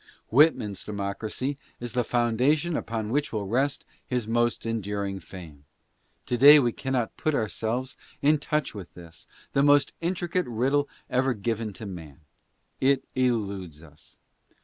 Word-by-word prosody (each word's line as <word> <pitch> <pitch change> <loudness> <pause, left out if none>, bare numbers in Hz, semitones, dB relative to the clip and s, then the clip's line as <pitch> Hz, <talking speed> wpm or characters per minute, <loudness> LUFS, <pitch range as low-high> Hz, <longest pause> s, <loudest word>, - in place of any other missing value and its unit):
Whitman's 115 - +3
democracy 105 +7 -3 0.2
is 120 -1 -5
the 125 -1 +1
foundation 125 +9 +1
upon 110 -4 -3
which 145 +3 0
will 105 -3 -2
rest 135 +7 0 0.2
his 125 -4 -1
most 120 +1 0
enduring 100 -3 -2
fame. 80 -7 -12 0.6
To 120 - -1
day 145 +3 +10
we 120 -5 +3
cannot 130 -2 -2
put 155 -1 0
ourselves 120 +3 -2 0.2
in 150 +1 +3
touch 150 +1 -1
with 100 -5 -9
this, 85 -2 -13 0.3
the 140 - +3
most 145 0 +4
intricate 175 +1 -1
riddle 135 +5 +1 0.2
ever 130 0 +1
given 110 +1 -2
to 110 - -8
man. 85 -5 -9 0.6
It 135 +1 +3
eludes 100 - -1
us. 75 -2 -17
120 Hz, 140 wpm, -26 LUFS, 100-140 Hz, 0.6 s, day